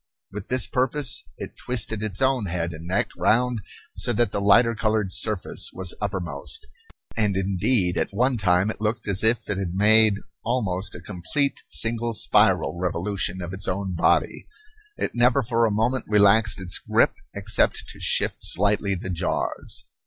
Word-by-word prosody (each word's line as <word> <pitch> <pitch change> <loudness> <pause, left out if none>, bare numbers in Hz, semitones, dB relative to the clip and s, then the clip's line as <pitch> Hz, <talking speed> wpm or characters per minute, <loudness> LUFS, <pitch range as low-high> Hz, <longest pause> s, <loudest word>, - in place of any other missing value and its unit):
With 100 0 -8
this 130 0 +3
purpose 130 +1 +1
it - - -8
twisted 115 -3 0
its 105 +2 -2
own 130 -6 +1
head 85 -1 -3
and 80 +1 -9
neck 90 - -1
round 125 +1 +1 0.4
so - - -1
that 120 -2 +1
the 100 - -2
lighter 115 +4 +4
colored 110 -3 -1
surface 110 -4 0
was 95 -2 -1
uppermost; 90 -8 -3 0.5
and 105 -4 0
indeed 95 0 +1
at - - -1
one 125 +6 +1
time 95 0 +2
it - - -10
looked 110 +1 -2
as 100 0 +1
if 115 +1 +1
it 100 -2 -3
had 90 -2 -4
made 110 +1 +5 0.3
almost 105 -6 -2
a 90 - -9
complete 105 - -2
single 115 0 +2
spiral 100 -5 +2
revolution 95 +1 -2
of 85 +2 -6
its 95 0 -4
own 95 0 -2
body. 85 - +1 0.5
It - - -3
never 125 +3 +3
for 115 0 +1
a - - -2
moment 115 +5 0
relaxed 105 0 +4
its 95 -1 -1
grip - - +2 0.2
except - - 0
to - - -9
shift - - +1
slightly 100 +1 +1
the 90 +1 -6
jaws. 90 0 -3
105 Hz, 165 wpm, -24 LUFS, 95-115 Hz, 0.5 s, made